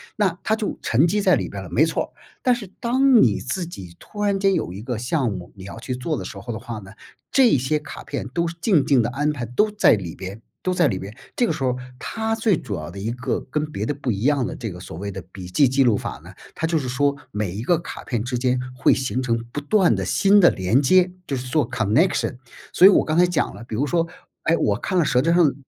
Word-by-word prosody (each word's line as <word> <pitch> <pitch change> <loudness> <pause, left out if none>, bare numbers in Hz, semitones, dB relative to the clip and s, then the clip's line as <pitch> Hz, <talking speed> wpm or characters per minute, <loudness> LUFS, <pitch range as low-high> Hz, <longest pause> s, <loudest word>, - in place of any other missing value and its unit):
那 190 -5 +1
它 220 - +2
就 215 -2 -3
沉 135 +9 +3
积 205 +4 +1
在 - - +4
里 - - -2
边 - - -6
了， - - -10
没 - - +4
错。 - - -3 0.3
但 250 - +4
是 240 -4 -5
当 255 +1 +4
你 105 -4 +2
自 170 +8 -3
己 95 - -10
突 205 - -9
然 200 -1 +1
间 195 0 +3
有 90 - -1
一 100 +4 -8
个 120 -2 -3
项 125 -1 0
目 90 -3 -7
你 95 - -11
要 100 +3 -8
去 125 +2 -4
做 150 +6 -2
的 - - -5
时 - - -8
候 120 - -6
的 110 - -5
话 115 -1 -7
呢， 95 -2 -12 0.4
这 260 -3 +5
些 135 +4 0
卡 150 - -9
片 140 - -5
都 170 +6 -1
是 165 - -5
静 180 -10 +3
静 135 -4 +4
地 115 - -1
安 145 +4 0
排 125 -4 -5
都 210 - +1
在 210 - +5
里 90 -6 -3
边 95 +3 -7 0.2
都 185 - 0
在 175 -4 +3
里 95 - -1
边， 100 +3 -7 0.2
这 245 - +2
个 - - 0
时 - - -4
候 125 -1 +1 0.2
它 225 0 -2
最 220 -5 +2
主 110 -9 -5
要 - - -6
的 90 - -10
一 105 +4 -3
个 125 +1 -2
跟 150 0 0
别 105 -6 -3
的 145 - -1
不 140 -4 -3
一 100 - -5
样 140 0 +2
的 - - -5
这 115 -4 -5
个 90 - -9
所 90 - -9
谓 100 +3 -4
的 95 - -6
笔 95 -2 -8
记 110 +10 +3
记 130 +2 +3
录 115 -5 +3
法 - - -6
呢， - - -12 0.2
它 - - -2
就 165 0 +1
是 130 - -4
说 140 +3 +1 0.2
每 105 -5 -2
一 100 +5 -5
个 175 +7 +3
卡 170 - -8
片 120 -4 -2
之 125 0 -2
间 125 0 +1 0.2
会 - - +4
形 130 -1 -1
成 115 -3 0
不 145 - -3
断 180 +5 +3
的 - - -2
新 200 +1 +4
的 175 - +7
连 95 +8 +1
接， 180 +6 +4 0.2
就 140 - -1
是 125 0 -5
做 135 -1 +1
connection。 125 - +1 0.3
所 185 - +7
以 - - +9
我 200 - +4
刚 155 0 -1
才 180 - +6
讲 175 -4 -1
了， 115 - -10
比 110 - -5
如 135 +6 +1
说， 165 +3 0 0.4
哎， 165 - +3
我 105 -10 +1
看 185 - -2
了 175 - +4
舌 125 -4 +2
尖 165 +5 +2
儿 - - +3
上 170 -5 +5
的 - - -6
135 Hz, 320 characters per minute, -22 LUFS, 115-175 Hz, 0.4 s, 以